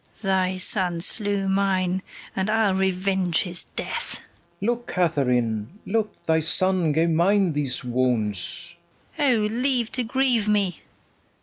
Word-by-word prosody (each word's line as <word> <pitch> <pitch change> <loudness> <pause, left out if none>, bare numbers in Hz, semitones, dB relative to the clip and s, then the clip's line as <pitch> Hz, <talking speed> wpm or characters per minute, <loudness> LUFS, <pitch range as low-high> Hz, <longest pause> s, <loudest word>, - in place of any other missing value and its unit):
Thy 190 -1 +1
son 185 -2 +1
slew 200 +2 +2
mine, 190 -1 +1 0.3
and 190 +2 -1
I'll 220 -3 +2
revenge 190 -2 +1
his 175 -1 +1
death. - - -3
FERNEZE. - - -18
Look, 240 +3 -1
Katharine, 125 - 0
look! 220 -2 -3
thy 160 0 +2
son 180 +1 +1
gave 165 +3 +1
mine 180 +2 +2
these 140 -4 -2
wounds. 125 - -2 0.4
KATHARINE. 270 -8 +3
O, - - +1
leave 250 -1 +1
to 250 - +1
grieve 245 -2 +2
me! 200 -5 +1
185 Hz, 130 wpm, -24 LUFS, 165-210 Hz, 0.4 s, KATHARINE